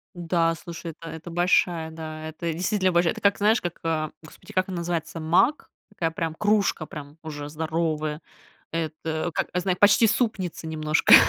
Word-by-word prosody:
Н-да, 165 -1 +1
слушай, 170 0 -7
это 165 +1 -11
это 160 +2 -8
большая. 175 -1 +2
Да, 155 -1 -6
это 165 +1 -3
действительно 185 +2 +1
большая. 170 -1 +3
Это - - -9
как 200 0 +4
знаешь, 215 +3 +3
как, 175 -1 -4
а, 155 -2 0
Господи, 155 - -14
как 185 0 +2
он 185 - -3
называется 170 -1 -2
маг 175 - +2 0.2
такая 170 -5 -2
прям 165 -1 -3
кружка, 205 -6 +2
прям 145 +1 -9
уже 145 -2 -6
здоровая. 155 -1 -1 0.5
Это 160 0 -2
как - - -1
не 180 - +2
знаю, 180 -1 0
почти 205 +2 +7
супница 200 -7 -1
немножко. 155 -1 +4
165 Hz, 170 wpm, -25 LUFS, 155-180 Hz, 0.5 s, почти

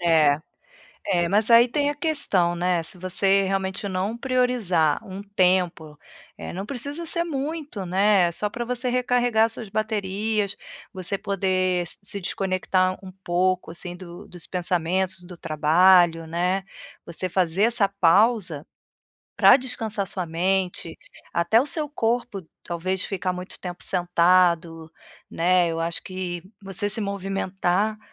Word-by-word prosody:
É. 155 -4 +4 0.7
É, 175 -3 +1
mas 210 +3 +2
aí 235 +1 +8
tem 285 +4 0
a - - -4
questão, 280 - +1
né, 175 -1 0
se 175 +3 -5
você 195 +2 +2
realmente 195 +1 -2
não 195 +5 -2
priorizar 240 - +1
um 195 -2 -8
tempo, 180 -6 0 0.4
eh, - - -7
não 190 +3 -5
precisa 285 +6 -4
ser 340 +1 +1
muito, 290 - -4
né, 190 -1 +3
só 210 +4 -2
pra 240 +2 -5
você 250 0 -2
recarregar 245 -2 +2
suas 225 -2 -8
baterias, 210 -1 -1 0.4
você 190 +1 -2
poder 185 -2 0
s - - -7
se 200 0 -5
desconectar 185 0 0
um 190 - -9
pouco, 180 +1 0
assim, 175 +1 -7
do 180 +2 -11
dos 175 -2 -10
pensamentos, 180 +1 -1
do 175 -1 -12
trabalho, 165 +2 +4
né, 180 +4 -1 0.4
você 175 +1 +1
fazer 185 +1 +1
essa 225 -3 +3
pausa 195 -3 +2 0.7
pra 255 - +7
descansar 220 -6 -2
sua 180 0 -3
mente, 180 +1 -1 0.4
até 170 +7 +3
o 280 - -1
seu 300 -1 0
corpo, 235 - -2 0.2
talvez 185 +3 -3
ficar 185 -2 -2
muito 180 +1 -7
tempo 180 -1 -7
sentado, 170 -2 +2 0.4
né, 175 +1 +2
eu 165 0 -3
acho 165 0 -2
que 180 -2 -5 0.2
você 195 +2 -2
se 220 - +1
movimentar 195 +1 -1
190 Hz, 140 wpm, -24 LUFS, 175-215 Hz, 0.7 s, aí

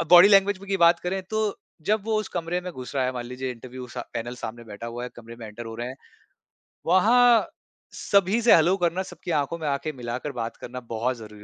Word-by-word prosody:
अ, - - 0
body 180 +2 +10
language 200 -1 +5
की 195 - +1
बात 170 -1 +5
करें 190 +2 -2
तो 215 -2 0 0.3
जब 215 0 +2
वो 220 -1 0
उस 215 - -6
कमरे 175 +1 -2
में 180 - -6
घुस 130 -1 -8
रहा 135 -2 +1
है 130 - 0
मान 120 -1 -5
लीजिए 125 +1 -4
इंटरव्यू 125 +1 -8
सा - - -6
पैनल 120 +2 -3
सामने 120 0 -7
बैठा 110 +1 -8
हुआ 120 +1 -5
है - - -4
कमरे 115 0 -11
में 115 - -8
एंटर 110 +2 -8
हो 115 - -7
रहे 120 +2 -4
हैं। 130 - -8 0.9
वहाँ 230 +6 +5 0.5
सभी 200 +3 +2
से 235 - +6
हेलो 170 +3 +4
करना 175 +1 0
सबकी 180 - -7
आँखों 150 +1 0
में 160 -2 -4
आँखे 145 +2 -1
मिलाकर 125 +2 -4
बात 115 -3 -5
करना 125 +1 -7
बहुत 120 +3 -1
ज़रूरी 105 -2 -11
140 Hz, 230 wpm, -25 LUFS, 120-185 Hz, 0.9 s, body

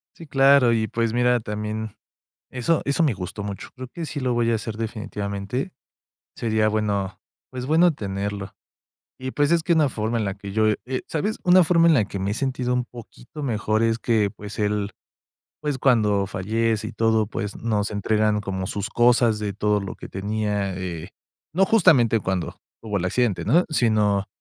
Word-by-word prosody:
Sí, 165 - -12
claro. 135 -3 +5
Y 110 -1 +1
pues 115 -1 -1
mira, 125 0 +3
también 105 0 -4 0.6
eso 130 +6 0
eso 140 +4 +1
me 145 -7 +2
gustó 95 +2 -6
mucho. 100 -1 -6
Creo 130 -1 -8
que 165 +6 -6
sí 150 -2 -5
lo 125 -2 0
voy 120 -1 +1
a 115 - +2
hacer 110 0 -5
definitivamente. 110 - -4 0.6
Sería 110 -2 +1
bueno, 105 -3 -1 0.3
pues, 125 -1 -6
bueno 165 +5 +4
tenerlo 100 -3 -4 0.7
y, 130 0 -4
pues, 145 0 +1
es 170 -1 +2
que 170 - +2
una 155 -3 +4
forma 110 -1 -2
en 110 - -1
la 100 - -2
que 100 -1 -8
yo 110 +1 +2 0.2
eh, 130 0 -3
sabes, 185 +8 -2
una 180 0 +6
forma 170 0 +4
en 165 - +6
la 115 -7 +3
que 100 -1 -6
me 95 +1 -1
he - - -1
sentido 130 -1 -1
un 125 0 +1
poquito 125 +5 -11
mejor 110 -4 0
es 115 0 +2
que, 110 -4 +1
pues 105 +2 -8
él, 105 -1 0 0.7
pues 145 -3 -2
cuando 105 -7 +3
fallece 110 +3 -1
y - - -5
todo, 110 -2 +2
pues 105 -1 -5
nos 105 -3 -1
entregan 105 0 +1
como 95 -2 -4
sus 100 +1 -3
cosas 120 -2 +3
de 105 -2 -3
todo 105 +1 +1
lo 100 -1 -6
que - - -9
tenía, 105 -1 -2
eh, 90 -4 -5 0.4
no 190 +4 +3
justamente 155 - +4
cuando 95 -3 -3 0.3
hubo 105 -2 -2
el 90 - -2
accidente, 110 0 0
¿no? 165 - +3
Sino 105 -8 +2
110 Hz, 185 wpm, -23 LUFS, 105-130 Hz, 0.7 s, una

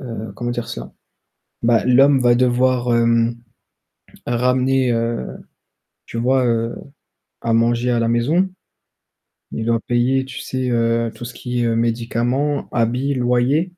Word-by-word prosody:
heu, 115 -4 -7
comment 120 0 -4
dire 120 -1 -4
ça? - - -7 0.7
Bah, 115 0 +3
l'homme 135 +2 +5
va 120 -1 +4
devoir 125 0 +2
hem, 115 0 +2 0.9
ramener, 125 +1 +1
heu, 115 - -1 0.8
tu 115 - -6
vois, 130 +2 +2
heu, 115 0 0 0.7
à 115 - -1
manger 120 +2 +2
à 120 - +1
la 115 - +1
maison. 145 +11 +2 1.0
Il 110 - -4
doit 115 0 +1
payer, 125 +2 +1
tu 135 0 -8
sais, 130 -1 -3
heu, 115 -1 +1
tout 110 +2 -9
ce 120 - -8
qui 125 0 -3
est 115 -1 +1
médicaments, 120 +5 -1
habits, 125 +4 0
loyers. 125 +4 +2
120 Hz, 140 wpm, -20 LUFS, 115-130 Hz, 1.0 s, l'homme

